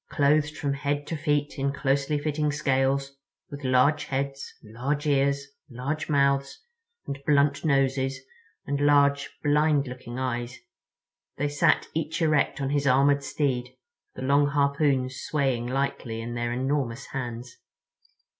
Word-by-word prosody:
Clothed 150 +1 +2
from 140 -1 -1
head 145 +1 -2
to 165 - -4
feet 145 -1 -1
in 140 +1 +1
closely 140 +1 0
fitting 150 0 -1
scales, 135 -1 0 0.3
with 145 0 -8
large 130 +4 +3
heads, 140 0 -3
large 130 +7 -3
ears, 140 -1 +2 0.2
large 140 +6 -4
mouths 140 -1 +1 0.4
and 140 - -5
blunt 140 -1 +2
noses 135 -2 +1 0.5
and 140 0 -2
large, 140 -1 +3
blind 150 -1 +3
looking 125 -1 -8
eyes, 125 -1 -3 0.8
they 145 - 0
sat 145 0 +2
each 160 +1 -2
erect 155 -4 +2
on 135 0 -1
his 145 -1 +1
armored 140 +2 +4
steed, 130 -3 -2 0.4
the - - -6
long 140 +2 +3
harpoons 140 -2 +1
swaying 135 -5 0
lightly 130 -3 -2
in 115 +1 -5
their 120 0 -2
enormous 130 0 -1
hands. 120 -2 -5
140 Hz, 135 wpm, -26 LUFS, 130-145 Hz, 0.8 s, armored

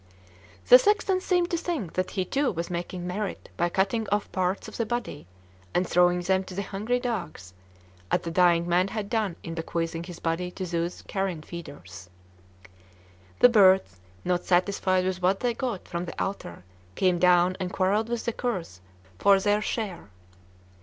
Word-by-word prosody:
The 250 - +10
sexton 400 +1 +2
seemed 355 -2 +1
to 340 - +1
think 320 - -3
that 185 0 -1
he 185 -2 -2
too 275 +7 0
was 170 0 -4
'making 175 +1 -4
merit' 195 +2 -4
by 175 - +1
cutting 195 +5 0
off 205 0 0
parts 185 +1 -1
of - - -9
the 230 - +1
body 240 - -4 0.5
and 180 0 +2
throwing 180 0 +3
them 190 +1 +1
to 185 - -9
the 200 - -2
hungry 215 +6 -2
dogs, 180 - -5 0.6
as - - +1
the 165 - -5
dying 170 -1 +3
man 180 +2 +3
had 210 0 -5
done 215 -7 0
in 165 - -5
bequeathing 165 0 -3
his 175 -2 -9
body 165 +2 -2
to 185 +1 -6
those 170 0 -3
carrion 190 -5 -3
feeders. 140 - -10 1.3
The 245 - +9
birds, 190 - +4 0.3
not 180 -1 0
satisfied 185 0 +1
with 185 -1 -2
what 185 +2 +2
they 245 -1 +1
got 235 -6 -4
from 175 0 -4
the 170 - -8
altar, 90 - -4 0.3
came 180 -2 +2
down 180 0 +4
and 185 -1 -3
quarrelled 200 +4 +1
with 240 -1 -3
the 235 - -1
curs 180 - -4 0.4
for 200 -1 +5
their 205 +1 +2
share. 205 - -4
185 Hz, 175 wpm, -26 LUFS, 175-210 Hz, 1.3 s, The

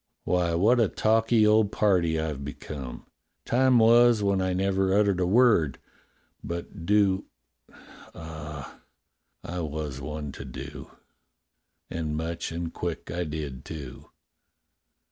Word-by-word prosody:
"Why, 85 -1 +1
what 110 +8 +4
a 115 - +4
talky 110 +2 +2
old 105 -1 +4
party 90 -6 +2
I've 75 -3 -3
become. 70 -2 -7 0.4
Time 130 +1 +4
was 115 -1 +5
when 100 -1 +2
I 95 0 0
never 95 +1 +1
uttered 100 -3 +2
a 90 - +1
word 95 - +4 0.3
— - - -40 0.3
but 85 -1 -6
do 100 -2 +3 0.4
— - - -19
ah, 75 -3 -8 0.6
I 90 +1 -5
was 75 -3 -4
one 75 0 -5
to 70 - -9
do. 65 -2 -8 1.0
And 80 -2 -3
much 80 +1 -3
and 85 0 -4
quick 85 -4 -4
I 85 +2 -2
did, 75 -4 -5
too." 70 -5 -9
85 Hz, 130 wpm, -27 LUFS, 75-105 Hz, 1.0 s, was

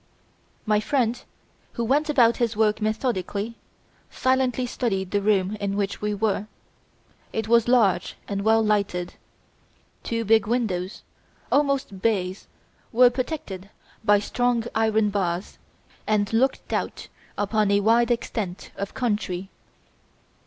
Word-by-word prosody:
My 210 -1 +3
friend, 245 0 0 0.5
who 235 - -2
went 290 +6 +1
about 240 -6 +4
his 235 -3 0
work 215 0 +2
methodically, 215 -1 -1 0.6
silently 260 -1 +1
studied 195 -6 -2
the 205 - +1
room 200 -1 +2
in 200 -1 -2
which 200 -1 -2
we 210 0 -1
were. 210 0 0 0.8
It 220 -1 -2
was 235 0 +4
large 215 -8 +3
and 200 -1 -2
well 220 +2 +4
lighted. 200 -4 0 0.9
Two 230 -1 -2
big 220 -1 +4
windows 210 -6 -2 0.5
almost 275 -9 +1
bays 190 -4 -1 0.4
were 245 +1 +6
protected 245 - -5 0.3
by 205 -1 +5
strong 245 +3 0
iron 220 -1 +2
bars 185 -2 -2 0.5
and 210 0 +1
looked 260 +4 +1
out - - -3 0.3
upon 205 0 +1
a 200 0 +4
wide 230 +3 +4
extent 215 -6 -3
of 200 0 -5
country. 205 -6 -2
215 Hz, 125 wpm, -24 LUFS, 200-235 Hz, 0.9 s, were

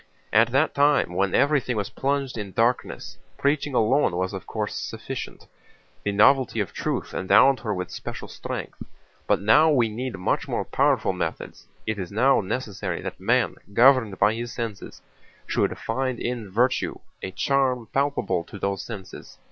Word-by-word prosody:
"At 115 +3 +6
that 135 +5 +2
time, 140 -10 +3
when 95 +1 +1
everything 140 -5 +2
was 100 -2 -3
plunged 140 -1 -1
in 105 -4 -6
darkness, 120 +2 -1 0.2
preaching 140 -1 0
alone 115 -3 +3
was 95 +2 -1
of 95 - -7
course 105 -2 -3
sufficient. - - -6 0.6
The 105 - 0
novelty 125 +3 +4
of 95 -6 -2
Truth - - -3
endowed 130 +8 +4
her 110 - -3
with 90 -2 -3
special - - -7
strength, - - -7 0.5
but - - +3
now 145 +11 +5
we 125 -7 +3
need 120 0 -4
much 90 - -1
more - - -2
powerful - - +2
methods. - - -5 0.2
It 110 -1 -2
is 90 -1 -5
now 125 +6 +3
necessary 100 -4 -4
that - - -6
man, - - +1 0.2
governed 120 -5 +5
by 105 - +4
his 120 +1 -5
senses, 115 -4 -6 0.4
should - - 0
find 130 +2 -2
in 120 -4 -3
virtue 120 +6 +1 0.2
a - - -4
charm 130 +2 0
palpable 140 -11 0
to 100 - -10
those 100 0 -2
senses. 100 -5 -9
115 Hz, 160 wpm, -25 LUFS, 100-135 Hz, 0.6 s, At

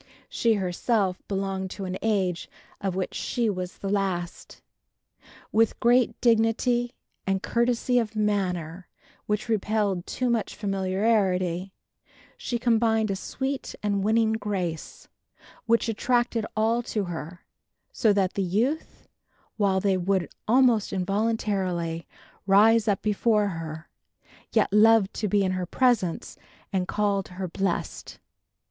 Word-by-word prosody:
She 230 -2 +2
herself 190 +1 0
belonged 195 -1 -2
to 195 +1 -6
an 185 0 -4
age 190 -6 0 0.3
of 195 -2 -2
which 190 -1 -2
she 235 -3 -1
was 185 -2 -5
the 195 - -6
last. 190 -3 -3 0.9
With 225 0 +2
great 240 -1 +3
dignity 240 +1 +2 0.3
and 195 0 0
courtesy 245 +1 +1
of 225 -2 -3
manner 185 -5 -1 0.4
which 210 +1 -1
repelled 210 -4 0
too 250 -1 -1
much 230 -3 -1
familiarity, 190 -2 0 0.6
she 240 - -3
combined 225 -2 +2
a - - -1
sweet 265 +7 -4
and 200 -2 0
winning 220 +1 +3
grace, 190 -7 -4 0.6
which 230 +1 +3
attracted 235 0 0
all 225 +2 +2
to 215 -3 -2
her, 175 -1 -7 0.5
so 220 - +2
that 195 -2 +1
the 200 - -1
youth, 225 - -1 0.5
while 195 -3 +2
they 190 -1 +1
would 185 0 0 0.2
almost 240 -2 +4
involuntarily 190 -4 -1 0.4
'rise 215 +3 +5
up 200 -3 +1
before 210 0 +2
her,' 160 -2 -6 0.6
yet 215 -3 +2
loved 215 -1 +5
to 215 - -2
be 200 0 +2
in 185 - 0
her 185 -1 -2
presence 235 -10 0 0.4
and 185 -1 0
called 200 -2 0
her 185 0 -5
blessed. 190 +1 -3
205 Hz, 125 wpm, -26 LUFS, 185-225 Hz, 0.9 s, rise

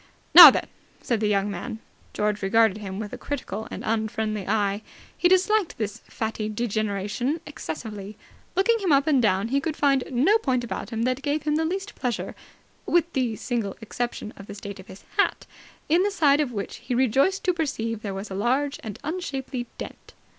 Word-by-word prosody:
"Now - - +14
then!" - - 0 0.4
said 235 -3 0
the 215 - +1
stout 200 -1 +2
young 205 - -3
man. 220 +5 -5 0.3
George 210 0 -1
regarded 215 +1 +3
him 195 -2 -6
with 210 0 -6
a - - -6
critical 235 -6 -5
and - - -7
unfriendly 215 -2 -1
eye. 205 -1 +1 0.3
He 355 - +3
disliked 375 +1 +2
this 215 0 -3
fatty 220 -1 -3
degeneration 215 - -1
excessively. 210 - -7 0.4
Looking 455 +5 +3
him 380 -5 0
up 280 0 +4
and 290 -5 +3
down, 205 0 +1
he 275 +2 +1
could 310 +1 -3
find 275 -2 +3
no 295 - +3
point 255 - 0
about 240 - -5
him 225 -1 -2
that 255 +2 0
gave 295 +1 -1
him 300 0 +1
the 320 +1 +1
least 385 +4 -3
pleasure, 245 -3 -3 0.5
with 340 -1 +2
the 245 -4 0
single 225 -4 -3
exception 235 -1 -4
of 200 - -11
the - - -8
state 200 -1 -8
of 190 - -12
his 190 - -12
hat, - - +1 0.4
in 335 +4 +4
the 405 - +2
side 295 -7 +3
of 280 -4 -1
which 200 -4 -5
he 245 - -4
was 250 - +3
rejoiced 275 - +2
to 365 - +2
perceive 230 -9 -2
there 200 -3 -4
was 195 +1 -6
a - - -3
large 260 +9 0
and 215 -4 -6
unshapely 270 -7 -4
dent. - - -9
240 Hz, 195 wpm, -25 LUFS, 210-290 Hz, 0.5 s, Now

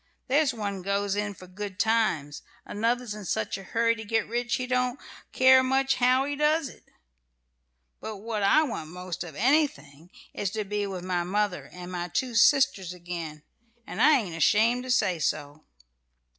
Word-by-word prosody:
There's 285 +2 +3
one 205 -5 -4
goes 200 +1 -1
in 205 -1 -2
for 185 - -13
good 190 +1 -7
times; 205 -10 0 0.2
another's 230 +1 -1
in 210 0 -8
such 110 - -2
a 195 - -7
hurry 230 +4 +1
to 225 -1 -8
get 225 +1 0
rich 240 +1 -1
he 255 - -3
don't 250 +1 0 0.3
care 260 0 +6
much 270 +1 +1
how 255 +2 +3
he 290 0 -3
does 300 0 +1
it; - - -17 1.1
but 220 -1 -6
what 215 +1 -4
I 250 +11 +5
want 195 - -5
most 180 0 -6
of 165 -4 -10
anything 180 - 0 0.2
is 200 - -2
to 215 -1 -2
be 205 0 -2
with 185 -2 -6
my 180 -1 -1
mother 200 +1 -2
and 180 0 -9
my 175 -1 -3
two 245 +8 -2
sisters 210 -6 +3
again, 170 -4 -7 0.4
and - - -5
I 300 -2 +6
ain't 180 -6 -7
ashamed 220 +8 +3
to - - -8
say 195 -8 +2
so." 145 0 -3
210 Hz, 175 wpm, -27 LUFS, 180-250 Hz, 1.1 s, care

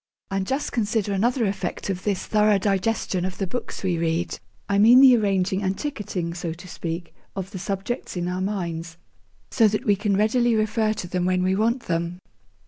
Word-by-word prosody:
And 195 -1 -1
just 270 +2 -1
consider 215 -3 0
another 235 +5 +1
effect 200 0 -3
of 185 0 -5
this 200 -3 -1
thorough 210 -1 +3
digestion 195 -1 0
of 185 0 -4
the 195 - -1
books 220 +3 -5
we 180 -3 0
read; 165 +1 -1 0.3
I 200 - +2
mean 235 +5 +8
the 265 -2 +8
arranging 195 -3 +1
and 190 0 -1
'ticketing,' 200 - -3
so 170 -1 -4
to 175 +3 -12
speak, 165 0 -5 0.2
of 190 0 -5
the 190 - -6
subjects 195 +3 -4
in 175 0 -1
our 180 +1 -2
minds, 170 -4 -3 0.5
so 225 - +5
that 210 0 -1
we 205 - +4
can 200 -1 0
readily 235 +3 +3
refer 215 0 +1
to 210 -4 -6
them 180 0 -1
when 185 0 +1
we 185 +1 +2
want 230 +5 +1
them. 170 +1 -2
195 Hz, 195 wpm, -24 LUFS, 180-215 Hz, 0.5 s, mean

